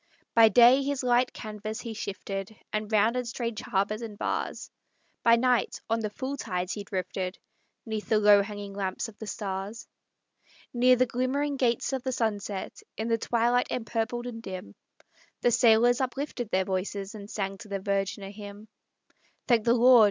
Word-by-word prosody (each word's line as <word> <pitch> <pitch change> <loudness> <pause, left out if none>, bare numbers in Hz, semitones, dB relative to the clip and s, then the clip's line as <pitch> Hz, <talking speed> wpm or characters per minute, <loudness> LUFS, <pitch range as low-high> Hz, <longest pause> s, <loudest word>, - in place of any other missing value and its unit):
By 225 -1 +7
day 245 +5 +7
his 275 -1 -2
light 245 0 +3
canvas 215 0 -6
he 230 -2 -5
shifted, 200 0 -5 0.2
And 215 0 -2
rounded 230 +4 +2
strange 235 -2 -3
harbors 205 +3 -1
and 220 -3 -7
bars; - - -3 0.5
By 230 0 +6
night, 250 0 +1
on 225 - +2
the 215 -1 -2
full 260 +6 -4
tides 180 -6 -3
he 205 - -5
drifted, 185 -1 -3 0.5
'Neath 220 -2 -4
the 220 - +4
low 205 -1 +6
hanging 205 -1 -6
lamps 195 +2 -3
of 215 - -17
the 220 - -7
stars. 200 +2 -4 0.9
Near 250 +1 +5
the 255 +1 +3
glimmering 260 +4 -1
gates 250 0 +1
of 265 - -1
the 260 - -2
sunset, 205 -5 -3 0.2
In 220 +1 -2
the 230 0 +2
twilight 240 +2 +2
empurpled 235 +1 -2
and 230 -2 -6
dim, 185 - -7 0.7
The 245 - +3
sailors 240 +2 +5
uplifted 260 -2 -3
their 190 -1 +1
voices, 195 +2 -3
And 205 -1 -9
sang 195 -2 -3
to 230 - -10
the 200 -1 -2
Virgin 195 0 -1
a 195 - -7
hymn. 205 +1 -10 0.8
"Thank 235 -4 +3
the 235 0 +4
Lord!" 250 +1 +7
220 Hz, 170 wpm, -28 LUFS, 200-240 Hz, 0.9 s, By